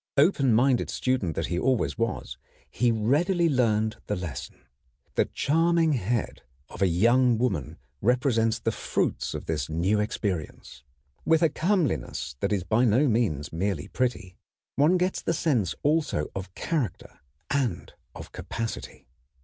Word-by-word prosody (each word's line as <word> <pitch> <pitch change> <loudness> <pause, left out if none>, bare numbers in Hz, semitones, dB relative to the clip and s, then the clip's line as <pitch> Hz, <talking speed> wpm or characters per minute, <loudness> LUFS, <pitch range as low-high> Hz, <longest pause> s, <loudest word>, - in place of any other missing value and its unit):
Open 140 -4 +4
minded 125 +3 +3
student 125 - -1
that - - -1
he 90 - -2
always 130 +1 +1
was, 115 - -3 0.3
he 120 +11 +1
readily 155 - +2
learned 110 -6 +1
the 105 - -1
lesson. 85 -9 -7 0.5
The - - +2
charming 165 +1 +2
head 115 -2 -2 0.3
of - - -10
a 95 - +5
young 120 +7 +3
woman 95 - -1 0.2
represents 115 -1 +2
the - - -1
fruits - - -2
of - - -6
this 75 -4 -2
new 90 +7 +1
experience. 95 - -4 0.4
With 160 +1 +3
a 165 - +5
comeliness 155 - -1
that - - -1
is 100 -4 0
by 110 +7 +2
no 125 +5 +4
means 105 - 0
merely 90 -2 -2
pretty, 120 -7 -2 0.4
one 155 +6 +4
gets 180 +1 0
the 165 - -1
sense 125 - 0
also 150 - +1
of 95 -1 -7
character 140 - -3 0.3
and 130 -10 -1 0.2
of - - -9
capacity. 110 - -6
115 Hz, 140 wpm, -26 LUFS, 95-140 Hz, 0.5 s, a